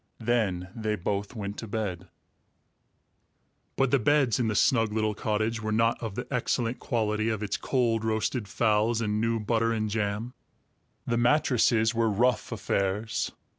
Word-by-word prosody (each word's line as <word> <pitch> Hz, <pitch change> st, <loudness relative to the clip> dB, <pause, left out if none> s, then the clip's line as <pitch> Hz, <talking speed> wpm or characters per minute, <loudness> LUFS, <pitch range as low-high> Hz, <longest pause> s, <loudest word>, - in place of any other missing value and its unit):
Then 105 Hz, -6 st, 0 dB
they 110 Hz, -2 st, -1 dB
both 100 Hz, +4 st, -3 dB
went 100 Hz, -1 st, -5 dB
to 115 Hz, -, -6 dB
bed. 100 Hz, -5 st, -3 dB, 1.7 s
But 135 Hz, -2 st, +1 dB
the 140 Hz, -, +4 dB
beds 130 Hz, -1 st, +2 dB
in 120 Hz, -, +1 dB
the 105 Hz, -, -1 dB
snug 115 Hz, -1 st, +3 dB
little 110 Hz, 0 st, 0 dB
cottage 110 Hz, +2 st, -1 dB
were 110 Hz, 0 st, -2 dB
not 115 Hz, +2 st, +2 dB
of 110 Hz, -4 st, -5 dB
the 125 Hz, -, -4 dB
excellent 120 Hz, -1 st, -1 dB
quality 110 Hz, -1 st, 0 dB
of 110 Hz, -1 st, -2 dB
its 105 Hz, -, -2 dB
cold 115 Hz, -4 st, 0 dB
roasted 110 Hz, +1 st, -1 dB
fowls 110 Hz, +1 st, +1 dB
and 105 Hz, -1 st, -1 dB
new 115 Hz, 0 st, +1 dB
butter 115 Hz, +1 st, +1 dB
and 110 Hz, -2 st, -1 dB
jam. 105 Hz, +3 st, -2 dB, 0.7 s
The 120 Hz, -, 0 dB
mattresses 120 Hz, -3 st, +3 dB
were 115 Hz, -1 st, +2 dB
rough 120 Hz, +6 st, +1 dB
affairs. 105 Hz, 0 st, -1 dB
110 Hz, 155 wpm, -27 LUFS, 105-120 Hz, 1.7 s, the